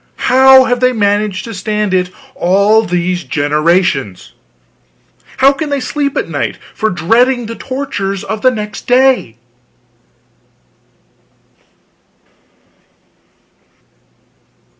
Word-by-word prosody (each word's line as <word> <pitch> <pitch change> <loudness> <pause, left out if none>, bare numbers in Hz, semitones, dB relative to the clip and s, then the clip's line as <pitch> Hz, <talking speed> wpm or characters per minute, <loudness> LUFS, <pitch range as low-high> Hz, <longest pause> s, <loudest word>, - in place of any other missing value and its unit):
How 265 +1 +7
have 245 -1 -1
they 255 0 +2
managed 205 -2 -1
to 230 - -7
stand 210 0 -2
it 180 -1 0 0.2
all 200 +5 +2
these 180 -2 -2
generations? 145 - -1 1.0
How 270 +1 +5
can 295 +2 -5
they 285 -1 -1
sleep 280 +1 -3
at - - -1
night - - -3 0.2
for 220 - -1
dreading 235 +9 +1
the 230 - -6
tortures 230 -8 -4
of 215 +1 -5
next 215 -4 -2
day? 250 - +2
215 Hz, 95 wpm, -13 LUFS, 185-255 Hz, 1.0 s, How